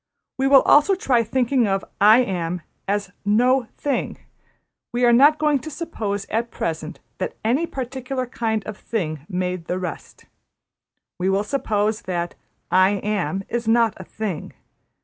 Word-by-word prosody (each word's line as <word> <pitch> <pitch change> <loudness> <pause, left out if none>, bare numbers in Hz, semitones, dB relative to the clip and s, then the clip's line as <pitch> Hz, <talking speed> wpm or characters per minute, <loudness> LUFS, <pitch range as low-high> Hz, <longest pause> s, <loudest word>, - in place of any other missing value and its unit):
We 270 0 +1
will 270 -1 +7
also 300 +7 +5
try 255 -10 +2
thinking 245 +1 +1
of 195 0 -1 0.2
`I 220 +5 +7
Am' 175 -3 -3 0.2
as 200 -1 -1
No 240 +4 +3
Thing, 285 -2 -2 0.7
we 245 +1 +1
are 240 - +5
not 290 +5 +6
going 300 -2 +2
to 315 - -8
suppose 220 - -4
at 230 +2 -1
present 160 -3 -4 0.2
that 185 - -3
any 270 +9 +2
particular 260 -1 -4
kind 220 -3 -2
of 215 -1 -6
thing 155 -10 -3
made 180 -2 -2
the 180 - -2
rest; 185 -1 -7 0.9
we 185 +1 +1
will 195 +1 +2
suppose 215 -4 -1
that 175 -2 -3 0.4
`I 190 +2 +4
Am' 195 -3 -1
is 235 -1 -3
not 230 -1 +4
a 185 - -8
thing. 195 -4 -5
220 Hz, 150 wpm, -22 LUFS, 190-255 Hz, 0.9 s, will